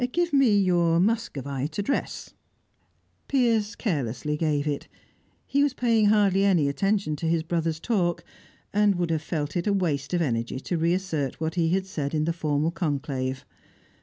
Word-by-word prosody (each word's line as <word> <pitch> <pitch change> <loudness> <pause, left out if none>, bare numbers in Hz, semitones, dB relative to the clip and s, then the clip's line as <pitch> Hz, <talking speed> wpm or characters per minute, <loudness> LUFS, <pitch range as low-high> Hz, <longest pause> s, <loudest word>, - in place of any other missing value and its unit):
Give 345 -2 0
me 260 -7 +5
your 175 -3 +3
Muscovite 150 - -1
address." 205 +8 -3 0.9
Piers 230 -6 +1
carelessly 150 - -2
gave 150 -2 0
it. 145 -2 -3 0.6
He 280 - +1
was 285 -2 +1
paying 230 -4 +3
hardly 200 -2 +3
any 180 -7 +3
attention 195 +3 0
to 165 - -3
his 165 -1 +1
brother's 165 -1 -1
talk, 175 -4 0 0.5
and 205 -1 +3
would 175 -1 -1
have 160 -2 0
felt 155 -2 -3
it 175 +2 -1
waste 170 -6 0
of 175 - +1
energy 120 -2 -2
to 175 - -3
reassert 165 -5 -1
what 160 0 -2
he 170 -2 +1
had 190 +2 +1
said 155 -5 -3
in 155 0 +1
the 170 - 0
formal 155 -1 0
conclave. 135 -5 -3
170 Hz, 160 wpm, -26 LUFS, 150-200 Hz, 0.9 s, me